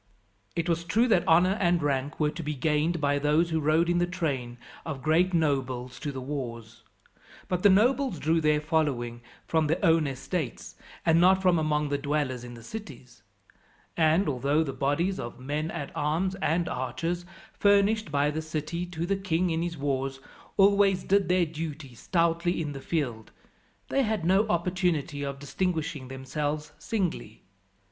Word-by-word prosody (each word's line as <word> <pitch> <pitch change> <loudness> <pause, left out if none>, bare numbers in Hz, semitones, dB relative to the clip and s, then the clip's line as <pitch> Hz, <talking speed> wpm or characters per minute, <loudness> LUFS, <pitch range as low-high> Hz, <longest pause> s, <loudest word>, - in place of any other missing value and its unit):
It 165 0 -1
was 170 -1 0
true 225 +8 +2
that 190 -6 +3
honour 180 +5 +4
and 175 -3 +2
rank 140 0 -1
were 150 -1 +2
to 170 - -6
be 150 -1 -3
gained, 155 +4 +1
by 145 -1 +1
those 150 +4 +2
who 160 - +1
rode 155 +3 +2
in 175 0 +2
the 175 - +1
train 140 -10 -3 0.3
of 140 -5 -6
great 170 +5 +3
nobles 130 -6 -1
to 145 - -3
the 135 - -6
wars, 120 -4 -6 0.7
but 180 -1 -1
the 205 - +6
nobles 240 +2 +3
drew 160 +3 +1
their 150 -1 +3
following 145 -7 -1 0.2
from 160 -2 +1
their 160 +3 +1
own 165 -3 +4
estates, 140 +2 -4 0.3
and 165 0 +4
not 190 +1 +6
from 180 -3 +3
among 150 -1 0
the 145 0 -1
dwellers 140 -4 -1
in 120 0 -9
the 115 - -12
cities; 130 - -9 0.7
and, 165 +4 +3
although 145 +3 +1
the 135 -4 -4
bodies 145 +8 0
of 120 +1 -6
men 145 +5 -3
at 150 -5 -5
arms 165 +5 0
and 170 +1 +1
archers, 165 +8 -3 0.3
furnished 205 0 +3
by 145 +1 +2
the 155 +1 -3
city 160 +3 -4
to 170 -1 -4
the 195 +3 +1
king 185 -2 0
in 160 0 0
his 170 -1 -3
wars, 135 -1 -2 0.4
always 200 -1 +4
did 195 -3 +2
their 180 -1 +3
duty 155 -4 -6
stoutly 170 +6 0
in 155 -3 -2
the 135 -1 -7
field, 125 -10 -3 0.6
they 275 - +2
had 220 -8 -1
no 195 +5 +3
opportunity 175 -5 0
of 140 -1 -3
distinguishing 155 -1 -2
themselves 145 +3 -3
singly. 185 - -3
160 Hz, 170 wpm, -27 LUFS, 140-175 Hz, 0.7 s, the